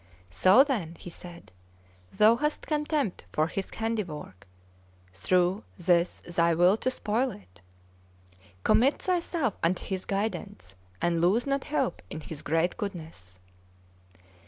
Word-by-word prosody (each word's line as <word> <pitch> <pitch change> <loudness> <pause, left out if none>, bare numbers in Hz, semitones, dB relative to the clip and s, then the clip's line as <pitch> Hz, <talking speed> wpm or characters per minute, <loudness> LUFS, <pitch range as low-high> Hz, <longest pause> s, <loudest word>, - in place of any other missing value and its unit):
"So, 185 - +6
then," 210 - -2
he 175 - -9
said, 175 0 -11 0.6
"thou 215 +2 +5
hast 300 +4 -2
contempt 300 - -1
for 155 - +2
His 190 +3 -4
handiwork, 185 - -4 0.7
through 180 - +1
this 175 -1 +1
thy 170 -1 +1
will 175 +4 +5
to 255 - 0
spoil 250 +1 0
it? 90 -3 -13 1.0
Commit 265 +5 +4
thyself 340 - -1
unto 175 +2 0
His 190 -1 -3
guidance, 195 - -3 0.3
and 170 -1 +2
lose 195 +8 +3
not 275 -1 -1
hope 280 -4 -1
in - - -6
His 150 -1 -8
great 165 +3 0
goodness!" 160 - -7
185 Hz, 125 wpm, -28 LUFS, 165-235 Hz, 1.0 s, So